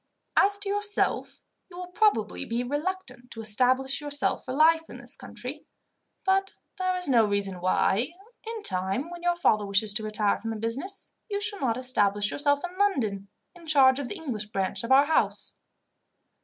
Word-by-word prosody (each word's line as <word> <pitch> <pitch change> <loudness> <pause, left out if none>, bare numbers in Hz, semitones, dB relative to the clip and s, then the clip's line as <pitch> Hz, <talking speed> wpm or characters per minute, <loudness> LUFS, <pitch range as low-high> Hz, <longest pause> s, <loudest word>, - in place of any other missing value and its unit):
As 405 +1 +4
to 405 0 -2
yourself, 410 +1 +1 0.3
you 350 - -12
will 360 0 -8
probably 360 - +1
be 235 +2 -2
reluctant 290 -3 -3
to 225 - -10
establish 255 +6 +1
yourself 290 0 0
for 255 - -6
life 320 +4 +3
in - - -9
this - - -7
country; - - -8 0.6
but 385 0 +1 0.2
there 370 0 0
is 360 - 0
no 240 -4 +4
reason 200 -3 0
why, 195 - +1 0.4
in 450 -2 -5
time, 190 - 0
when 350 -1 -8
your 350 0 +1
father 215 -11 +2
wishes 200 +1 +2
to 215 +1 0
retire 210 -1 0
from 225 -1 -5
business, 265 - -3 0.2
you 405 -1 -2
should 410 -1 -4
not 240 -3 0
establish 205 -5 +3
yourself 285 0 +1
in 360 - -15
London, 220 - 0 0.3
in 345 -2 -16
charge 270 -3 +5
of 280 - -4
the - - -5
English 250 - -4
branch 195 -1 -3
of 230 - -4
our 275 +2 +6
house." 315 +1 0
265 Hz, 175 wpm, -26 LUFS, 215-355 Hz, 0.6 s, our